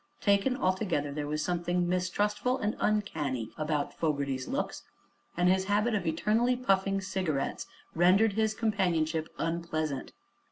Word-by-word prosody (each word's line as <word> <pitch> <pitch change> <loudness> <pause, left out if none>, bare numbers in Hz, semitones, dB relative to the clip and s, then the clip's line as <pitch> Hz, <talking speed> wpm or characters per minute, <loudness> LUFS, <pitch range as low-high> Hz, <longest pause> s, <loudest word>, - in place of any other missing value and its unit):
Taken 205 +4 +2
altogether 185 - 0
there 145 0 -3
was 150 0 -1
something 175 0 0
mistrustful 205 +7 0
and 215 -3 -1
uncanny 150 - -1
about 150 -2 -1
Fogerty's 140 -4 -1
looks, - - -2 0.6
and 175 +1 +3
his 190 +1 +3
habit 210 +4 +1
of 190 -5 -1
eternally 220 +9 +2
puffing 195 -5 +1
cigarettes 185 -7 -2 0.3
rendered 190 +6 +4
his 220 +1 +1
companionship 170 -8 0
unpleasant. 160 -4 -2
180 Hz, 125 wpm, -30 LUFS, 155-210 Hz, 0.6 s, rendered